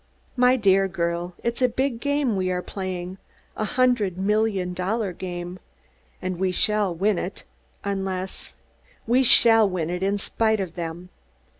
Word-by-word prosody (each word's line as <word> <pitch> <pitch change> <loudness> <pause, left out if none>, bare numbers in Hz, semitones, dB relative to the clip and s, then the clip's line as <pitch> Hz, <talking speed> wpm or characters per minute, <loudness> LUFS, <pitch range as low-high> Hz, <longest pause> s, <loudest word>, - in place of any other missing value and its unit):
"My 250 0 +4
dear 195 -4 +3
girl, 175 -1 -3
it's 235 +2 -2
a 250 - +4
big 255 0 -1
game 285 -4 0
we 185 -1 0
are 180 0 -2
playing 185 -1 -5 0.4
a 215 - -2
hundred 240 -6 +1
million 200 -2 0
dollar 190 +2 -2
game! 175 0 -6 0.6
And 185 -1 -3
we 190 -1 +1
shall 210 +1 +2
win 195 +2 +1
it, 185 - -6 0.4
unless 190 -1 -4 0.5
we 245 +3 +3
shall 225 -4 +6
win 175 -3 -2
it, 180 0 -3
in 200 +1 +1
spite 220 +1 0
of 185 -4 -4
them. 170 +1 -6
195 Hz, 150 wpm, -24 LUFS, 180-225 Hz, 0.6 s, shall